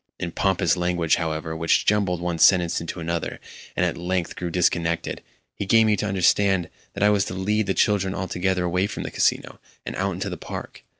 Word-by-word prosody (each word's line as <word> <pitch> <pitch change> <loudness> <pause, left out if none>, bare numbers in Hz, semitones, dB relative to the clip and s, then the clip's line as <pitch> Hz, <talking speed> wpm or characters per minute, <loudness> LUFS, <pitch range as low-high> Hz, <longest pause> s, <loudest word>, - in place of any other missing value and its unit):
In 85 - -3
pompous 95 -3 +1
language, 90 -2 +1
however, 80 -1 -3
which 80 0 +2
jumbled 100 -5 +1
one 85 -2 -2
sentence 85 -1 +4
into 85 +2 -6
another, 85 0 -3 0.4
and - - +2
at - - -1
length 90 0 -2
grew 90 - -4
disconnected, 85 -1 0 0.3
he 100 - -5
gave 115 +2 +5
me 105 -1 +3
to 105 - -2
understand 95 -1 +2 0.2
that - - -1
I 105 - +5
was 100 -2 +2
to 90 - -5
lead 105 +2 0
the 95 - 0
children 100 -2 +1
altogether 95 0 -1
away 90 +3 +1
from 100 - -5
the - - -5
Casino, - - 0 0.3
and - - -5
out 95 +7 -1
into 95 +2 -4
the 90 - -5
park. - - -8
90 Hz, 200 wpm, -24 LUFS, 85-95 Hz, 0.4 s, gave